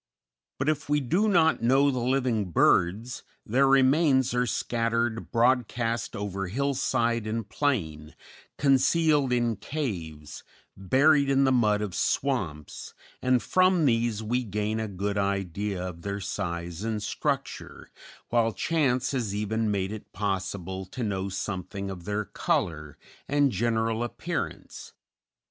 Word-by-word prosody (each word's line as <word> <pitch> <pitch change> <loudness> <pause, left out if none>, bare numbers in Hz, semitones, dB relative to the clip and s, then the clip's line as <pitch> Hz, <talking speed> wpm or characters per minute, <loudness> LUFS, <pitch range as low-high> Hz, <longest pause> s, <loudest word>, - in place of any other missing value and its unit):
But 135 - -2
if 150 -1 -1
we 150 0 +3
do 175 - +1
not 165 -5 +3
know 135 +4 +4
the 130 - -2
living 120 -5 0
birds, 100 +8 +2 0.2
their 130 +5 +3
remains 135 -1 +4
are 125 0 +1
scattered 115 0 -1
broadcast 120 -1 +1
over 100 -2 -3
hillside 120 -1 0
and 110 -1 -3
plain, 80 - -2 0.4
concealed 140 +1 +3
in 120 -3 +1
caves, 85 - -5 0.3
buried 140 - +3
in 135 0 +3
the 135 - +3
mud 105 -4 +2
of 100 -4 -4
swamps, 95 - -2 0.3
and 130 -1 +2
from 185 -3 +3
these 115 -3 +1
we 125 +4 0
gain 105 0 -2
a 110 - -2
good 100 +1 -2
idea 100 -1 -2
of 85 -2 -11
their 100 +1 -4
size 85 -3 -4
and 110 -2 -2
structure, - - -4 0.4
while 115 -1 +2
chance 140 -5 0
has 115 -7 -2
even 110 +1 -1
made 100 -1 -1
it 110 -1 -8
possible 95 -1 -3
to 125 +6 -5
know 100 -2 -2
something 95 0 -4
of 90 -3 -9
their 105 +1 -2
color 75 -6 -2 0.3
and 145 -1 +2
general 115 +1 0
appearance. 120 - -5
115 Hz, 130 wpm, -27 LUFS, 100-130 Hz, 0.4 s, know